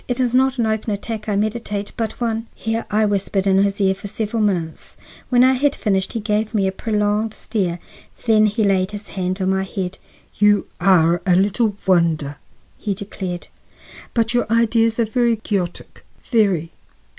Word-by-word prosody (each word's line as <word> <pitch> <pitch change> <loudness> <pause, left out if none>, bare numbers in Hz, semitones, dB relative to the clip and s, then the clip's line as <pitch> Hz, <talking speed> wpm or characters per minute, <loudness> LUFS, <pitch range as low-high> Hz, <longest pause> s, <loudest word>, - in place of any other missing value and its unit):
It 245 0 -2
is 250 -2 +1
not 265 +1 +3
an 235 - +1
open 220 0 -1
attack 215 +1 -4
I 205 - +1
meditate, 210 -1 -2
but 225 -2 -3
one—" 225 -1 -2
Here 225 +1 -3
I 215 +1 +2
whispered 200 -1 0
in 195 0 +4
his 200 0 0
ear 190 -1 +3
for 200 +1 -8
several 220 +2 -2
minutes, 175 -6 -2 0.3
when 245 -1 +5
I 260 +1 +5
had 280 +2 +1
finished 195 -3 0
he 230 - -2
gave 215 +1 -1
me 200 -2 +2
a 190 - +1
prolonged 210 +1 -1
stare, 185 -6 -2 0.5
then 215 -2 +5
he 215 +2 0
laid 195 -1 +1
his 205 0 -7
hand 185 0 -3
on 190 - +1
my 190 0 +1
head. 190 -1 -5 0.4
"You 205 0 +4
are 175 -2 +4
a 180 - +5
little 200 +2 +1
wonder," 165 -6 +2 0.4
he 205 -2 -2
declared. 190 -3 -6 0.7
"But 225 -1 +1
your 240 -2 0
ideas 230 0 +2
are 230 - +3
very 235 +1 +2
quixotic, 195 -5 -4 0.2
very. 195 - +1
210 Hz, 180 wpm, -20 LUFS, 190-225 Hz, 0.7 s, when